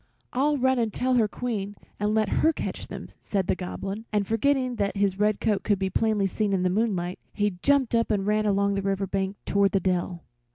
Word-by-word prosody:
"I'll 290 Hz, +3 st, +2 dB
run 260 Hz, -1 st, +2 dB
and 225 Hz, -2 st, 0 dB
tell 255 Hz, +3 st, 0 dB
her 230 Hz, -4 st, +4 dB
Queen 205 Hz, -3 st, -4 dB, 0.2 s
and 210 Hz, +1 st, +1 dB
let 220 Hz, -1 st, +2 dB
her 320 Hz, -, +5 dB
catch -, -, -5 dB
them," -, -, -8 dB
said 195 Hz, -3 st, -1 dB
the -, -, +1 dB
Goblin, 195 Hz, +4 st, -5 dB
and, 205 Hz, -2 st, +1 dB
forgetting 255 Hz, +3 st, +1 dB
that 200 Hz, 0 st, -1 dB
his 200 Hz, -1 st, +1 dB
red 210 Hz, 0 st, +2 dB
coat 210 Hz, -3 st, +1 dB
could 205 Hz, -2 st, +1 dB
be 190 Hz, 0 st, -2 dB
plainly 215 Hz, -1 st, +1 dB
seen 200 Hz, +1 st, 0 dB
in 185 Hz, -2 st, +1 dB
the 180 Hz, -, +2 dB
moonlight, 185 Hz, -4 st, -1 dB
he 205 Hz, -4 st, -1 dB
jumped 280 Hz, -4 st, +3 dB
up 230 Hz, 0 st, +2 dB
and 200 Hz, -3 st, 0 dB
ran 215 Hz, +1 st, +1 dB
along 200 Hz, 0 st, +2 dB
the 200 Hz, -, -1 dB
river 195 Hz, 0 st, -1 dB
bank 195 Hz, +1 st, -2 dB
toward 200 Hz, 0 st, +2 dB
the 195 Hz, -, +3 dB
dell. 180 Hz, -1 st, -1 dB
205 Hz, 220 wpm, -26 LUFS, 195-225 Hz, 0.2 s, her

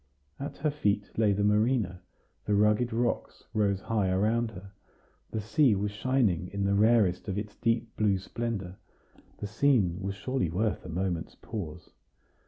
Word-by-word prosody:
At 140 Hz, -, -5 dB
her 150 Hz, 0 st, 0 dB
feet 105 Hz, -8 st, 0 dB
lay 110 Hz, -2 st, +3 dB
the 100 Hz, +1 st, +1 dB
marina; 105 Hz, -3 st, +2 dB, 0.4 s
the 105 Hz, -, +2 dB
rugged 105 Hz, +4 st, +3 dB
rocks 120 Hz, +1 st, -1 dB
rose 100 Hz, -3 st, +1 dB
high 105 Hz, -4 st, 0 dB
around 110 Hz, +5 st, +1 dB
her; 95 Hz, -2 st, -11 dB, 0.6 s
the 110 Hz, -, -3 dB
sea 110 Hz, +3 st, +3 dB
was 100 Hz, +1 st, -1 dB
shining 105 Hz, -6 st, +1 dB
in 100 Hz, +1 st, -3 dB
the 100 Hz, -, +2 dB
rarest 105 Hz, -3 st, +3 dB
of 95 Hz, -1 st, -2 dB
its 105 Hz, 0 st, -4 dB
deep 115 Hz, -1 st, 0 dB
blue 105 Hz, -3 st, +3 dB
splendor. 100 Hz, -2 st, -4 dB, 0.6 s
The -, -, -5 dB
scene 105 Hz, -6 st, +2 dB
was 100 Hz, +1 st, -3 dB
surely 130 Hz, -3 st, -1 dB
worth 105 Hz, +5 st, -1 dB
a -, -, -8 dB
moment's 85 Hz, -1 st, -2 dB
pause. 90 Hz, -7 st, -7 dB
105 Hz, 160 wpm, -29 LUFS, 95-115 Hz, 0.6 s, lay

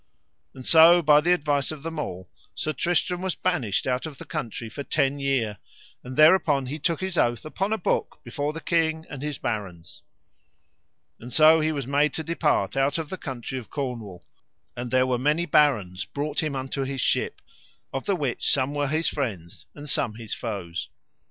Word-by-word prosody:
And 130 Hz, -, -10 dB
so 170 Hz, +2 st, +7 dB
by 150 Hz, 0 st, +6 dB
the 175 Hz, +3 st, +2 dB
advice 145 Hz, -5 st, +1 dB
of 155 Hz, -2 st, -7 dB
them 165 Hz, -1 st, -4 dB
all 95 Hz, -9 st, -5 dB, 0.3 s
Sir 155 Hz, -, -2 dB
Tristram 175 Hz, +4 st, 0 dB
was 190 Hz, -1 st, -2 dB
banished 130 Hz, -, 0 dB
out 130 Hz, +4 st, -1 dB
of 145 Hz, -3 st, -10 dB
the -, -, -10 dB
country 115 Hz, 0 st, -5 dB
for 125 Hz, +6 st, -7 dB
ten 140 Hz, 0 st, 0 dB
year, 125 Hz, -7 st, 0 dB, 0.4 s
and 125 Hz, +1 st, -8 dB
thereupon 155 Hz, -4 st, +5 dB
he 145 Hz, +5 st, -5 dB
took 165 Hz, +2 st, -1 dB
his 190 Hz, -2 st, -1 dB
oath 120 Hz, +3 st, +1 dB
upon 195 Hz, +6 st, -2 dB
a 220 Hz, -, +2 dB
book 180 Hz, -, -1 dB
before 145 Hz, +4 st, -3 dB
the 160 Hz, +1 st, -7 dB
king 160 Hz, -1 st, 0 dB
and 140 Hz, -3 st, -6 dB
his 150 Hz, -1 st, -3 dB
barons. 100 Hz, -9 st, -5 dB, 1.2 s
And 120 Hz, +2 st, -10 dB
so 155 Hz, +4 st, +6 dB
he 155 Hz, 0 st, +1 dB
was 140 Hz, -4 st, -3 dB
made 145 Hz, +3 st, +2 dB
to 160 Hz, -, -3 dB
depart 155 Hz, -11 st, 0 dB
out 135 Hz, +2 st, +1 dB
of 160 Hz, -2 st, -4 dB
the -, -, -4 dB
country 130 Hz, -2 st, -5 dB
of 120 Hz, -, -12 dB
Cornwall; 115 Hz, -, -5 dB, 0.5 s
and 120 Hz, 0 st, -5 dB
there 130 Hz, +1 st, +3 dB
were 125 Hz, -2 st, 0 dB
many 150 Hz, +6 st, +1 dB
barons 110 Hz, -, +2 dB
brought 145 Hz, +1 st, -3 dB
him 155 Hz, -3 st, -2 dB
unto 135 Hz, +1 st, -3 dB
his 135 Hz, 0 st, -4 dB
ship, -, -, 0 dB, 0.5 s
of 135 Hz, -, -4 dB
the 200 Hz, -, +2 dB
which 140 Hz, -8 st, -1 dB
some 135 Hz, +1 st, +1 dB
were 145 Hz, -1 st, 0 dB
his 155 Hz, +3 st, 0 dB
friends 100 Hz, -, -4 dB
and 150 Hz, 0 st, -9 dB
some 120 Hz, -6 st, 0 dB
his 115 Hz, -2 st, -6 dB
foes. 100 Hz, -7 st, -5 dB
140 Hz, 190 wpm, -25 LUFS, 125-155 Hz, 1.2 s, so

